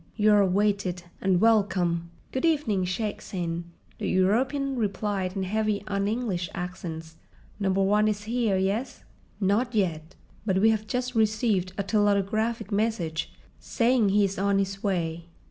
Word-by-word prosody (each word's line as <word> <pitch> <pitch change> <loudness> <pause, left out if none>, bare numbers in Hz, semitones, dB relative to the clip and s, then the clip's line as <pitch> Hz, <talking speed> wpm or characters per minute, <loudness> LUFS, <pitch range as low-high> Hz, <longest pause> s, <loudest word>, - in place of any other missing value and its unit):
You 215 -1 +4
are 205 - +6
awaited—and 190 -2 0
welcome!" 185 -6 +2 0.2
"Good 260 - -2
evening, 285 - +1
Shaik 205 +4 -3
Tsin," 170 -2 -4 0.3
the - - -2
European 260 +9 +1
replied 200 -4 -2
in 195 - -1
heavy 210 +1 0
un 200 -1 -1
English 205 -7 -2
accents. 165 -3 -6 0.4
"Number 195 -1 +1
One 210 +2 +3
is 205 -1 -1
here, 225 -3 0
yes?" 200 +7 -2 0.4
"Not 220 +5 +1
yet. 165 -5 -1 0.3
But 190 -3 +1
we 220 +3 +5
have 220 0 -2
just 250 +2 -2
received 215 -4 +1
a 200 - 0
telautographic 205 +2 +1
message 200 -7 -1 0.3
saying 235 -3 +2
he 205 +1 +4
is 195 -1 -3
on 200 0 +2
his 195 0 -1
way." 170 -5 -2
200 Hz, 145 wpm, -26 LUFS, 185-220 Hz, 0.4 s, are